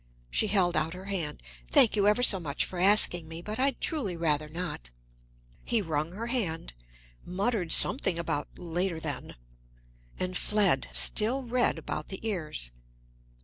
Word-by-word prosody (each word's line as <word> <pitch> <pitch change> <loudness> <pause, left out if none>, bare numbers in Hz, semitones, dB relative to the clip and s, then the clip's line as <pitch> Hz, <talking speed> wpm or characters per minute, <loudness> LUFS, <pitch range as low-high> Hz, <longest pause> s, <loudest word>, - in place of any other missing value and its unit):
She 215 - +1
held 185 -4 +2
out 165 +3 -1
her 185 +1 -10
hand, 155 - -4 0.3
"Thank 225 - +5
you 205 -1 +2
ever 210 +4 +3
so 195 -6 +6
much 150 -4 -2
for 180 - -7
asking 180 -4 +4
me, 165 +1 -9
but 215 +4 -6
I'd 270 0 +1
truly 220 - -2
rather 155 -2 0
not." 165 - -6 0.7
He 235 - +1
wrung 160 -3 -3
her 220 +4 -5
hand, 190 - -2 0.5
muttered 190 -1 -2
something 190 - +5
about 165 -3 -3
"later, 175 0 -3
then," 150 -4 -6 0.8
and 185 0 -3
fled, 195 -9 +2
still 240 +5 +2
red 245 0 0
about - - -5
the 195 +3 -6
ears. 155 - -3
180 Hz, 150 wpm, -28 LUFS, 160-215 Hz, 0.8 s, so